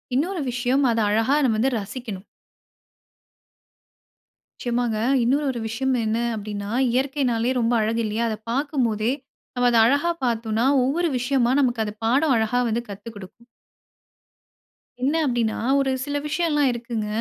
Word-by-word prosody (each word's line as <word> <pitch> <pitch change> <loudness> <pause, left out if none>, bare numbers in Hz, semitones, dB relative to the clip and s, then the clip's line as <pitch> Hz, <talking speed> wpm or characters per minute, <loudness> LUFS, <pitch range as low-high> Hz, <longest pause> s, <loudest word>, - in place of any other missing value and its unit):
இன்னொரு 345 +5 0
விஷயம் 250 +3 +1
அத 230 - 0
அழகா 225 +6 +2
நம்ம 225 -4 +1
வந்து 260 +5 +2
ரசிக்கணும். 210 -1 -7 2.3
நிச்சயமாங்க. 240 -2 -1 0.2
இன்னொரு 270 +5 +1
ஒரு 240 - -5
விஷயம் 260 +4 0
என்ன 220 +1 0 0.2
அப்படின்னா, 205 -1 -5 0.2
இயற்கைன்னாலே 255 -2 0
ரொம்ப 230 +1 +1
அழகு 225 +2 0
இல்லையா? 215 +2 -1
அதை 215 - -3
பாக்கும் 275 0 0
போதே, 215 +2 0 0.4
நம்ம 245 0 +2
அத 235 - +3
அழகா 285 +8 +2
பார்த்தோன்னா, 230 0 0 0.2
ஒவ்வொரு 325 +6 +1
விஷயமா 245 0 +1
நமக்கு 240 -4 +1
அது 210 - -5
பாடம் 270 +5 +3
அழகா 225 +3 +1
வந்து 230 +2 0
கத்து 205 +3 -8
குடுக்கும். 205 +4 -12 1.6
என்ன 285 +5 +2
அப்படின்னா, 235 -3 0 0.2
ஒரு 270 -1 +1
சில 290 +1 -2
விஷ்யலாம் 300 -3 +1
இருக்குங்க. 230 -2 -4
240 Hz, 135 wpm, -23 LUFS, 220-270 Hz, 2.3 s, அத